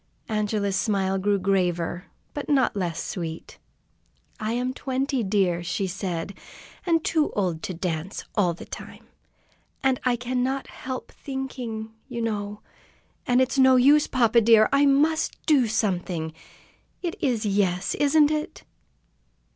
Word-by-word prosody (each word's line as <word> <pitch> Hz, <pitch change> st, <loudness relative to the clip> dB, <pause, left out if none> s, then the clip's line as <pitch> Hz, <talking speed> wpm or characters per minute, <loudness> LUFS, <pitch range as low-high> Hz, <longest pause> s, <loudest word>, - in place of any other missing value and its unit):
Angela's 210 Hz, -2 st, 0 dB
smile 195 Hz, -2 st, +1 dB
grew 200 Hz, +1 st, +2 dB
graver, 180 Hz, -3 st, 0 dB, 0.3 s
but 290 Hz, -, -5 dB
not 270 Hz, -6 st, +3 dB
less 175 Hz, -4 st, -2 dB
sweet. 165 Hz, -3 st, -6 dB, 0.8 s
"I 215 Hz, +1 st, -2 dB
am 250 Hz, +2 st, -1 dB
twenty, 265 Hz, 0 st, -1 dB
dear," 190 Hz, -4 st, +1 dB
she 175 Hz, +3 st, -1 dB
said. 185 Hz, -1 st, -3 dB, 0.7 s
"Too 310 Hz, -2 st, +1 dB
old 180 Hz, -6 st, -1 dB
to 185 Hz, -, -4 dB
dance 170 Hz, +1 st, -3 dB
all 180 Hz, -5 st, +2 dB
the -, -, -10 dB
time, -, -, -10 dB, 0.8 s
and 265 Hz, -1 st, +2 dB
I 250 Hz, -1 st, +2 dB
cannot 255 Hz, +2 st, -1 dB
help 260 Hz, -1 st, -7 dB
thinking, 250 Hz, -5 st, -5 dB, 0.2 s
you 235 Hz, -3 st, -4 dB
know. 210 Hz, -2 st, -3 dB, 0.7 s
And 250 Hz, +1 st, +4 dB
it's 260 Hz, +1 st, +1 dB
no 260 Hz, 0 st, +7 dB
use, 285 Hz, +4 st, +5 dB
papa 235 Hz, -2 st, +3 dB
dear! 220 Hz, -1 st, +6 dB
I 280 Hz, +1 st, +5 dB
must 300 Hz, +3 st, +2 dB
do 280 Hz, -7 st, +4 dB
something! 180 Hz, -7 st, -1 dB, 0.7 s
It 340 Hz, -2 st, -2 dB
is 235 Hz, -5 st, 0 dB
'yes,' 195 Hz, -2 st, +1 dB
isn't 295 Hz, +1 st, +4 dB
it?" 305 Hz, 0 st, -3 dB
220 Hz, 130 wpm, -25 LUFS, 190-260 Hz, 0.8 s, no